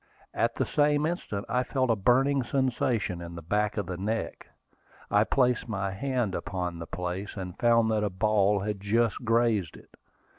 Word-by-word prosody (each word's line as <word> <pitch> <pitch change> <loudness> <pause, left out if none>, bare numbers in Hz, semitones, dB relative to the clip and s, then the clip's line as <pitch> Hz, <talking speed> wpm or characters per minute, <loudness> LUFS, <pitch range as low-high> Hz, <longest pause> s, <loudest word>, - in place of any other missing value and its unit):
At 115 +1 0
the - - 0
same 150 0 +2
instant 155 - -3
I 125 - +1
felt 130 -1 0
a - - +3
burning 130 +7 +3
sensation 120 -8 0
in 85 0 -8
the 85 - -8
back 105 +5 0
of 105 - -1
the 90 0 -5
neck. 110 +4 -3 0.6
I 105 +1 +5
placed 125 +1 +1
my 100 -2 -2
hand 125 -1 -1
upon 90 -3 -3
the 85 - -7
place, 90 +3 -4
and 90 -2 -5
found 115 -1 +4
that 105 -1 +1
a 105 - +1
ball 100 0 +2
had 105 0 -3
just 115 +4 0
grazed 115 -6 +1
it. - - -19
105 Hz, 180 wpm, -28 LUFS, 95-120 Hz, 0.6 s, I